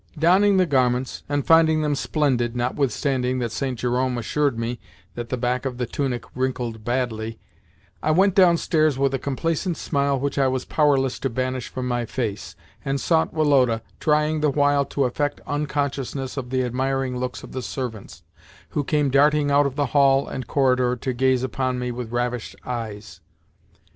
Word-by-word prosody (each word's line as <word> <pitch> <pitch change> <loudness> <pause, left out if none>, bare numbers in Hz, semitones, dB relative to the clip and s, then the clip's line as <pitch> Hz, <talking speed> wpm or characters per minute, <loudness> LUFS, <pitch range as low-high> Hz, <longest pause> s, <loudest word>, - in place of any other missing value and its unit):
Donning 190 +5 +4
the 185 - +4
garments, 130 -4 0
and 145 -1 -1
finding 160 -1 +5
them 150 -1 +1
splendid 130 -5 0
(notwithstanding 130 0 0
that 120 -3 -2
St. 125 +2 -3
Jerome 125 +1 0
assured 140 +2 0
me 115 +1 -3 0.3
that 120 -1 -6
the 130 - -1
back 125 +1 -1
of 130 -2 -4
the 125 - -1
tunic 125 0 -2
wrinkled 125 -3 -3
badly), 115 -2 -2 0.6
I - - -1
went 190 +5 +4
downstairs 165 -5 +3
with 135 0 +1
a 135 - 0
complacent 165 +5 -2
smile 140 -1 0
which 140 +1 -2
I 135 - +4
was 130 -1 -1
powerless 135 -4 +2
to 135 - -1
banish 130 +1 -2
from 130 -1 -5
my 120 -1 -1
face, 105 -6 -4 0.3
and 140 0 -1
sought 160 +3 +1
Woloda, 135 -7 +2 0.2
trying 150 0 +2
the 150 - +3
while 145 0 +2
to 140 0 -1
affect 145 +4 -1
unconsciousness 140 -2 -2
of 130 -3 -5
the 130 0 0
admiring 130 +1 -1
looks 125 0 -4
of - - -10
the 130 - -4
servants, 120 -5 -6 0.5
who 145 - -1
came 145 -1 +1
darting 145 +1 +3
out 140 0 +4
of 135 - -6
the 145 -1 +1
hall 140 -1 +4
and 130 - -6
corridor 125 -2 +2
to 125 +2 -3
gaze 130 0 +2
upon 130 0 -1
me 125 0 -2
with 120 -1 -6
ravished 120 -1 -2
eyes. 105 -7 -6
130 Hz, 175 wpm, -23 LUFS, 125-145 Hz, 0.6 s, finding